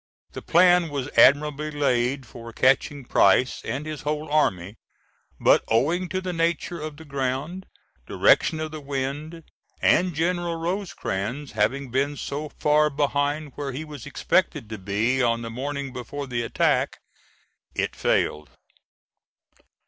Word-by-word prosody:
The - - -7
plan 175 0 +4
was 140 -2 -4
admirably 150 +3 +4
laid 135 -2 0
for 115 0 -10
catching 135 +3 +2
Price 125 +1 +3
and 145 +3 -4
his 155 -2 -5
whole 150 0 -3
army, 100 - +1 0.6
but - - +4
owing 165 +11 +1
to 185 - -1
the 185 -1 -4
nature 170 0 -1
of 155 -1 -6
the 160 - -12
ground, 140 +6 -3 0.4
direction 160 - +3
of 155 0 -4
the 155 -1 -7
wind, 145 +4 -4 0.4
and 180 -3 +3
General 170 +1 0
Rosecrans 150 - -3
having 120 +5 -1
been 140 +3 0
so 150 +3 -4
far 150 +1 +2
behind 145 +1 -1
where 140 -2 -5
he 150 +5 -5
was 145 -5 -9
expected 110 - 0
to 110 - -5
be 105 +7 0
on 115 -1 +1
the 115 - -6
morning 140 +2 -4
before 135 +3 -6
the 120 -3 -2
attack, 115 - +1 0.8
it - - -1
failed. 75 0 0
145 Hz, 140 wpm, -24 LUFS, 130-155 Hz, 0.8 s, plan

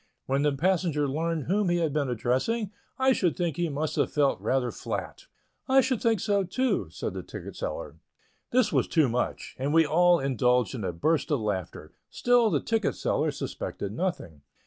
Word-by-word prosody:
When 135 +1 0
the 150 0 +3
passenger 160 -1 +1
learned 160 +2 -1
whom 195 +5 +1
he 175 - +2
had 160 -4 0
been 145 -3 0
addressing, 130 - 0 0.3
I 265 0 +4
should 180 -8 0
think 170 -5 -1
he 175 -1 -1
must 150 +1 -3
have - - +1
felt 145 -2 +1
rather 130 -2 0
flat." - - -6 0.4
"I 270 +1 +6
should 255 -2 -1
think 225 -3 +2
so, 200 +1 +1
too," 255 +8 -1
said - - -5
the - - -5
ticket - - -9
seller. - - -5 0.5
This 235 -3 +2
was - - +2
too 160 -5 +3
much, 120 +1 -3
and 140 +4 0
we 165 0 +6
all 175 +3 +4
indulged 125 -2 +1
in 120 -5 -5
a 90 - -1
burst 155 - 0
of 145 -4 +1
laughter; 95 -7 -4 0.2
still 245 -2 +3
the - - +1
ticket 225 -3 0
seller - - 0
suspected 100 - -5
nothing. 115 - -3
160 Hz, 190 wpm, -27 LUFS, 135-200 Hz, 0.5 s, I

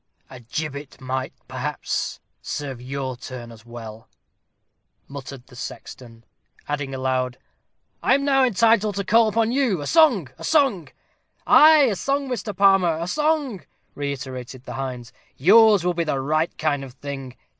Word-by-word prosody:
"A 130 - -10
gibbet 145 +3 -6
might, 130 0 -3 0.2
perhaps, - - -3 0.2
serve 135 -4 -5
your 130 0 -4
turn 120 -1 -9
as 115 +1 -15
well," 115 -2 -10 1.0
muttered 135 -2 -9
the 130 - -17
sexton; 115 -1 -9 0.4
adding 145 -2 -3
aloud, 130 -1 -1 0.6
"I - - +4
am 280 0 -1
now 270 -2 +4
entitled 225 -3 +3
to 200 - -2
call 225 +3 +4
upon 225 +1 +1
you; 250 - +1
a 145 - -5
song! 265 - +4
a - - -9
song!" 270 - +2 0.6
"Ay, 310 0 +7
a 230 -7 +2
song, 275 +7 -1
Mr. 230 -4 -4
Palmer, 195 -5 +4
a 165 - -3
song!" 295 - 0 0.3
reiterated 130 -3 -6
the - - -8
hinds. 125 -3 -6 0.2
"Yours 205 - +6
will 180 - +2
be 170 0 -1
the 150 -4 -1
right 155 +4 -1
kind 145 -3 0
of 130 -2 -10
thing." 135 -2 -7
145 Hz, 150 wpm, -23 LUFS, -, 1.0 s, Ay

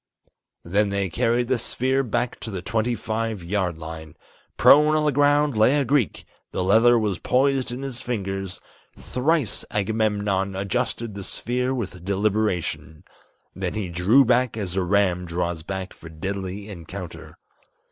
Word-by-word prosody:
Then 100 +4 +1
they 100 -2 -1
carried 120 +7 +1
the 130 -1 +1
sphere 130 +4 0
back 120 -1 -2
to 110 - -6
the 95 -4 -5
twenty 115 +4 0
five 110 -2 -3
yard 90 -2 -1
line, 80 -1 -8 0.4
Prone 150 +2 +6
on 155 0 +2
the 150 - +3
ground 145 0 +3
lay 110 +7 +4
a 140 - +1
Greek, 130 -4 0 0.3
the 90 - -1
leather 120 +5 +5
was 105 -5 -1
poised 135 -1 +1
in 125 +3 -5
his 130 -2 -5
fingers 95 -6 -4 0.4
Thrice 130 - 0
Agamemnon 100 -2 0
adjusted 115 +3 -2
the 100 0 -7
sphere 125 +6 -2
with 95 -9 -4
deliberation; 100 -5 -1 0.5
Then - - -3
he 105 -4 -3
drew 95 +11 +4
back 125 -1 +2
as 95 -4 -3
a 95 - +1
ram 90 -1 +1
draws 85 -1 -2
back 95 +2 -5
for 80 - -12
deadly 95 +4 -5
encounter. 90 -1 -9
105 Hz, 150 wpm, -24 LUFS, 95-125 Hz, 0.5 s, Prone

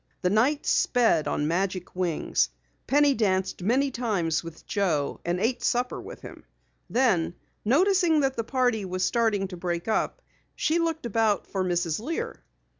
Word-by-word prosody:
The 180 - +2
night 265 +8 +2
sped 225 -11 +3
on 150 - 0
magic 185 +2 -2
wings. 175 - 0 0.4
Penny 285 +1 +4
danced 190 -5 0
many 260 +8 +2
times 195 -11 -1
with 165 -1 -10
Joe 165 -9 -1
and 175 +1 -1
ate 235 +5 0
supper 245 +1 0
with - - -10
him. - - -11 0.5
Then, 195 -10 +2 0.3
noticing 335 - +3
that 270 -1 0
the 230 - -1
party 245 -3 +1
was 185 0 -2
starting 220 -4 +1
to 180 - -7
break 175 0 -3
up, 225 - -1 0.3
she 325 +2 +1
looked 325 -3 -1
about 220 -2 +1
for 190 -1 -2
Mrs. 175 -2 0
Lear. 300 +9 -4
215 Hz, 155 wpm, -26 LUFS, 180-260 Hz, 0.5 s, Penny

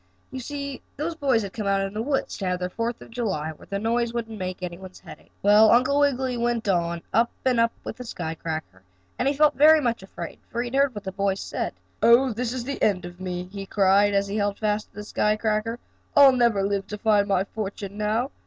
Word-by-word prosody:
You 265 - -5
see 280 +1 -5 0.2
those 315 +4 -2
boys 270 -8 +1
had 195 - -6
come 215 -3 -4
out 195 0 +2
in 195 0 -3
the 215 - -2
woods 270 +3 -1
to 195 - -2
have 180 0 -1
their 180 0 -3
Fourth 230 +2 -3
of - - -15
July, 190 -10 -2
where 155 - -15
the 200 - -3
noise 230 +2 0
wouldn't 225 -2 -4
make 185 0 -5
any 175 -1 -4
one's 185 -1 -11
head - - -11
ache. - - -25
Well, 210 +2 +7
Uncle 260 +5 +4
Wiggily 265 -3 +1
went 235 -2 -1
on, 170 -2 0
up 230 +3 +3 0.2
and 250 -2 +3
up, 230 0 +3
with - - -6
the 250 - -7
sky 160 -8 -5
cracker, 155 - -6 0.4
and - - +1
he 280 - +3
felt 300 0 +4
very 310 +2 +7
much 235 -7 -1
afraid 175 -3 -8
for 235 +1 -2
he 245 - -4
had - - -4
heard 275 -3 +3
what 205 - -6
the 190 - -4
boys 195 0 -1
said. - - -4 0.3
"Oh, 235 +2 +5
this 235 +1 -2
is 255 -1 -3
the 280 +3 -5
end 185 -4 +2
of 175 +1 -10
me!" 180 -1 -3
he 195 +2 -8
cried, 200 +1 +3
as 200 0 +2
he 200 +2 -3
held 205 -1 0
fast 210 -1 -1
to - - -33
the 210 - -6
sky 210 0 +1
cracker. 215 +1 -1 0.4
"I'll 280 -2 +9
never 235 -6 +2
live 200 0 -1
to 210 - -5
find 210 -1 +3
my 195 -2 +2
fortune 200 -1 -6
now. 220 +6 0
215 Hz, 245 wpm, -25 LUFS, 195-245 Hz, 0.4 s, I'll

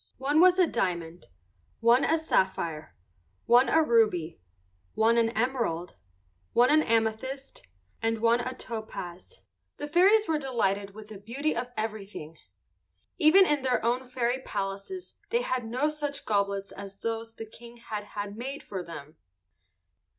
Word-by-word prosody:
One 285 +4 +2
was 365 +1 +6
a 370 - +6
diamond, 175 - -3 0.5
one 235 +3 +5
a 325 - +3
sapphire, 170 - -1 0.5
one 245 +3 +5
a 320 0 +4
ruby, 210 - +2 0.5
one 225 +1 +4
an 225 -1 +3
emerald, 225 -9 -1 0.6
one 245 +3 +5
an 310 +1 +5
amethyst, 230 +4 -1 0.4
and 225 0 0
one 230 +1 +3
a 255 +1 -4
topaz. 220 - -8 0.4
The 290 - -4
fairies 390 +7 +5
were 315 -2 +1
delighted 200 -7 -1
with 215 0 -11
the 210 -3 -9
beauty 260 +9 -2
of 240 +1 -3
everything. 205 -7 -5 0.8
Even 370 +4 +7
in 295 -4 +1
their 255 -3 0
own 250 +2 0
fairy 245 0 -1
palaces 200 - -5 0.2
they 475 +1 +1
had 255 - -2
no 255 +6 +1
such 295 -2 -4
goblets 200 -1 0
as 195 0 -10
those 225 0 -3
the 225 - -7
King 235 +2 -13
had 215 -3 -6
had 205 0 -6
made 270 +5 -6
for 190 -2 -5
them. 160 -3 -10
230 Hz, 145 wpm, -28 LUFS, 200-270 Hz, 0.8 s, Even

